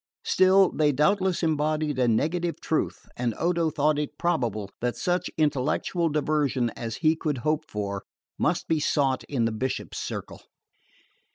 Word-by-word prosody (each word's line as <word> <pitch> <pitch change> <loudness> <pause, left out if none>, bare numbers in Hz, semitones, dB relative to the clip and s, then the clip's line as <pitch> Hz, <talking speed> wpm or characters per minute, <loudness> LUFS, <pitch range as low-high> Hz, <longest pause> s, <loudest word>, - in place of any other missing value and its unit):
Still, 190 0 +5
they 150 -1 +2
doubtless 185 +6 +2
embodied 155 -2 0
a 125 - +3
negative 165 +9 0
truth, 160 - -2
and 120 -3 -1
Odo 170 -1 +1
thought 150 0 +1
it 150 0 -4
probable 115 - -1
that 120 0 -1
such 180 0 0
intellectual 155 +3 +1
diversion 145 -5 0
as 115 -1 -5
he 155 +1 +5
could 150 -3 -2
hope 155 0 +1
for 100 -2 -3 0.4
must - - 0
be 160 -1 +2
sought 140 -3 +1
in 125 -5 0
the 115 - +1
Bishop's 130 +4 -3
circle. - - -6
150 Hz, 150 wpm, -26 LUFS, 125-165 Hz, 0.4 s, Still